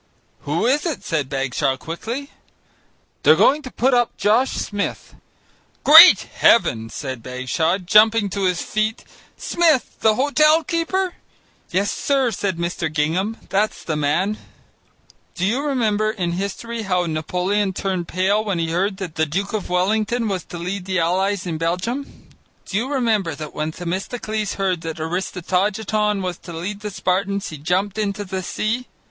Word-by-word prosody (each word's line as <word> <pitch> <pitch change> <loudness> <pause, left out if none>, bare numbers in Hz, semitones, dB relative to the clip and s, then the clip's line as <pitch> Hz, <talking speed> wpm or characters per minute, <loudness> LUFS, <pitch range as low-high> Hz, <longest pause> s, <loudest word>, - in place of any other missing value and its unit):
"Who 150 +8 0
is 290 +7 +2
it?" 315 - -4
said 150 -5 -2
Bagshaw 135 0 -1
quickly. 230 - -6 0.9
"They're - - +6
going 295 +3 +4
to 265 - -8
put 260 +1 +1
up 240 -1 +1
Josh 230 +6 +3
Smith." 205 -1 -4 0.7
"Great 325 +5 +10
Heaven!" 115 - +2
said 130 -3 -6
Bagshaw, 130 +8 -1
jumping 210 +3 +4
to 200 0 -1
his 180 -2 0
feet; 215 +1 -2 0.3
"Smith! 320 -7 +1
the 220 -1 +3
hotel 305 +4 +4
keeper." 345 +5 -1 0.6
"Yes, 200 +3 0
sir," 270 -4 +1
said 195 -3 -2
Mr. 170 -1 -2
Gingham, 170 +9 0
"that's 210 +2 0
the 160 - -2
man." 165 +8 0 1.0
Do 180 - -1
you 235 +8 +1
remember, 220 -7 +1
in 185 -6 -2
history, 200 +6 -4
how 180 -4 0
Napoleon 180 +5 -1
turned 185 -2 -3
pale 195 +4 +1
when 200 -4 -2
he 165 -1 -1
heard 190 +3 0
that 185 -5 -6
the 160 0 0
Duke 195 +8 -2
of 215 -3 -3
Wellington 215 +6 +1
was 190 -4 -2
to 175 - -8
lead 180 +2 -4
the 190 -1 -1
allies 190 +4 0
in 165 -3 -3
Belgium? 185 +12 -3 0.4
Do - - -6
you 250 +6 -2
remember 220 - 0
how 155 -1 -6
when 155 +1 -3
Themistocles 200 +5 -3
heard 185 -4 -1
that 165 -1 -5
Aristogiton 195 +5 -1
was 180 -2 -4
to 175 - -10
lead 185 +5 -5
the 210 0 -5
Spartans, 195 +1 -1
he 155 - -8
jumped 190 +7 -1
into 205 -1 -2
the 190 0 -4
sea? 225 +7 -2
195 Hz, 155 wpm, -21 LUFS, 175-220 Hz, 1.0 s, Great